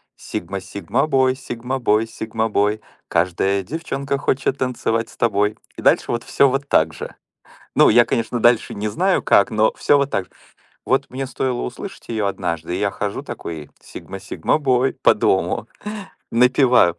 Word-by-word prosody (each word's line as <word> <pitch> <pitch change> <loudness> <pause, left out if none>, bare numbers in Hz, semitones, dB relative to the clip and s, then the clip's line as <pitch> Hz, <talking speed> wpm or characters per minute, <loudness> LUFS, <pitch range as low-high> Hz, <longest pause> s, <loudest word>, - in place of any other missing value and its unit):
"Сигма, 100 0 -5
Cигма-бой, 130 - 0
Cигма-бой, 120 -3 -1
Cигма-бой. 110 -2 -1 0.3
Каждая 95 +3 +1
девчонка 140 - -3
хочет 135 -1 0
танцевать 115 -3 -1
с - - -17
тобой". 105 -2 +1 0.2
И - - -6
дальше - - +3
вот 120 -1 -2
всё 140 - +3
вот 135 +2 -2
так 80 - +3
же. - - -8 0.6
Ну, - - +6
я, 120 +2 +6
конечно, 115 +1 -1
дальше 120 0 +3
не 105 +1 -2
знаю 185 - +1
как, 100 - +4
но 110 0 +2
всё 145 - +3
вот 140 0 +1
так 95 - -1
же. - - -32 0.6
Вот 135 +1 +1
мне 135 +2 -4
стоило 125 -1 -2
услышать 190 +11 -7
её 110 -3 -1
однажды, 90 -3 -3
и - - -3
я 100 -1 +1
хожу 100 0 -4
такой: 80 -3 -7
"Cигма - - -9
Сигма-бой", 130 -3 +1
по - - +6
дому, - - 0 0.6
напеваю. 125 -6 +4
115 Hz, 155 wpm, -21 LUFS, 100-130 Hz, 0.6 s, Ну